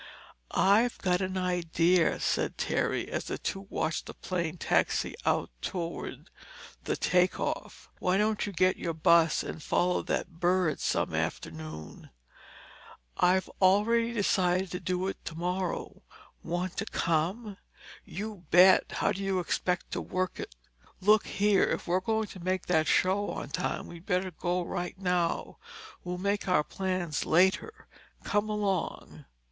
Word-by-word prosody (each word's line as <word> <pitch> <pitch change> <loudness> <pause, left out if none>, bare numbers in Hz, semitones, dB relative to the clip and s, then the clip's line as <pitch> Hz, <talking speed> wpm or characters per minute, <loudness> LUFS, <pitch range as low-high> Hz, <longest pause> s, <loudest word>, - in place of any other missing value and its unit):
"I've 220 +5 +3
got 180 0 +1
an 185 0 -2
idea," 175 -1 +2
said - - 0
Terry - - 0
as - - -2
the - - -3
two 195 -1 -4
watched 155 0 -2
the - - -8
plane 175 -2 -3
taxi - - +1
out - - +1
toward 170 -2 -5 0.5
the - - 0
takeoff. 180 0 0
"Why 180 +1 +2
don't 210 0 +1
you - - -4
get 185 0 +2
your 165 -1 -3
bus 165 0 +4
and 160 - -6
follow 180 +4 +1
that 165 - -3
bird 175 -3 +2
some - - 0
afternoon?" 80 -1 -5 1.1
"I'd 185 +1 +4 0.2
already 225 +5 +4
decided 190 -4 +1
to 180 - -3
do 185 0 -1
it 195 - -5
tomorrow. 180 +2 -3 0.4
Want 175 +1 -3
to 215 - -1
come?" 190 +6 -1 0.5
"You 205 -2 -7
bet! 185 +2 +6
How - - +1
do 195 - -4
you 195 -1 0
expect 180 0 -1
to - - -2
work 185 0 -2
it?" - - -7 0.4
"Look 210 +2 +4
here, 205 -1 +3
if - - -2
we're 180 +2 +2
going 220 +3 0
to 190 - -10
make 185 0 -1
that 160 -3 +2
show 195 +5 +2
on - - -5
time, - - -2
we'd 170 +1 -12
better 185 -1 0
go 175 +2 -1
right 180 +1 -4
now. 180 -3 -1 0.4
We'll 180 0 -4
make 200 +2 -1
our 165 -5 +3
plans 185 -3 -2
later. 190 - +2 0.4
Come 205 0 0
along." 205 -4 -2
185 Hz, 145 wpm, -29 LUFS, 175-195 Hz, 1.1 s, bet